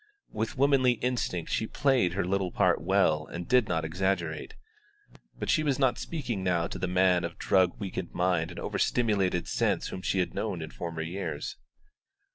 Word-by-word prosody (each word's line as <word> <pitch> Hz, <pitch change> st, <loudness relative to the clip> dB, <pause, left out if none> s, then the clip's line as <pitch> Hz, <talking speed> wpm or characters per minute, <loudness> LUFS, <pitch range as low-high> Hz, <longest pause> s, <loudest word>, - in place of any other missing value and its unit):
With 110 Hz, +3 st, -3 dB
womanly 135 Hz, -2 st, +4 dB
instinct 120 Hz, -8 st, -2 dB
she 110 Hz, -, 0 dB
played 130 Hz, -12 st, +2 dB
her 95 Hz, -1 st, 0 dB
little 95 Hz, -1 st, 0 dB
part -, -, +2 dB
well 85 Hz, -5 st, +2 dB
and 85 Hz, 0 st, -6 dB
did 125 Hz, -3 st, +4 dB
not 80 Hz, -2 st, -1 dB
exaggerate; 85 Hz, -2 st, -2 dB, 0.8 s
but -, -, -4 dB
she 155 Hz, -, +3 dB
was 145 Hz, -4 st, +1 dB
not 130 Hz, -3 st, +2 dB
speaking 125 Hz, -, -3 dB
now 90 Hz, -3 st, +1 dB
to -, -, -6 dB
the 90 Hz, -, -1 dB
man 90 Hz, -1 st, +3 dB
of -, -, -5 dB
drug 95 Hz, -2 st, +2 dB
weakened 95 Hz, -3 st, -4 dB
mind 90 Hz, -2 st, +1 dB
and 90 Hz, -, -8 dB
over -, -, -3 dB
stimulated 100 Hz, -7 st, +1 dB
sense -, -, 0 dB
whom 95 Hz, -, -6 dB
she 95 Hz, -, -1 dB
had 90 Hz, -, 0 dB
known -, -, -3 dB
in -, -, -8 dB
former 80 Hz, +6 st, -5 dB
years. 85 Hz, -3 st, -4 dB
95 Hz, 180 wpm, -29 LUFS, 85-115 Hz, 0.8 s, womanly